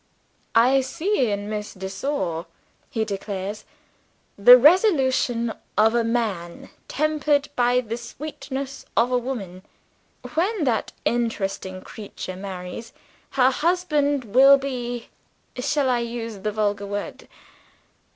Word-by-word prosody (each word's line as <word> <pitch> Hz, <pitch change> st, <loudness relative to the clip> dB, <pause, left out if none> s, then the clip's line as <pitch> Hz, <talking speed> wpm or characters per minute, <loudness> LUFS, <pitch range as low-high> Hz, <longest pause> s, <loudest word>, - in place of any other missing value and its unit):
"I 255 Hz, +4 st, +5 dB
see 295 Hz, -, 0 dB
in 205 Hz, 0 st, -3 dB
Miss 210 Hz, -1 st, -5 dB
de 190 Hz, 0 st, -5 dB
Sor," 190 Hz, -, -3 dB, 0.4 s
he 225 Hz, -5 st, -1 dB
declares, 200 Hz, 0 st, -5 dB, 0.7 s
"the 245 Hz, +5 st, +9 dB
resolution 260 Hz, -, +3 dB, 0.2 s
of 220 Hz, +1 st, +5 dB
a 235 Hz, -1 st, +2 dB
man, 215 Hz, -7 st, -3 dB, 0.2 s
tempered 300 Hz, -1 st, +1 dB
by 245 Hz, 0 st, +3 dB
the 230 Hz, -1 st, -5 dB
sweetness 270 Hz, +2 st, -6 dB
of 240 Hz, +2 st, +3 dB
a 250 Hz, -, +3 dB
woman. 205 Hz, -8 st, -6 dB, 0.7 s
When 365 Hz, +4 st, 0 dB
that 235 Hz, -6 st, 0 dB
interesting 195 Hz, -5 st, -2 dB
creature 200 Hz, -3 st, -8 dB
marries, 190 Hz, +3 st, -7 dB, 0.4 s
her 260 Hz, 0 st, +5 dB
husband 295 Hz, -4 st, +1 dB
will 275 Hz, +2 st, +8 dB
be 245 Hz, -3 st, -5 dB, 0.5 s
shall 275 Hz, +2 st, 0 dB
I 250 Hz, -1 st, +2 dB
use 230 Hz, -2 st, -5 dB
the 210 Hz, +2 st, -2 dB
vulgar 205 Hz, -1 st, -1 dB
word? 205 Hz, 0 st, -5 dB
240 Hz, 115 wpm, -23 LUFS, 205-275 Hz, 0.7 s, the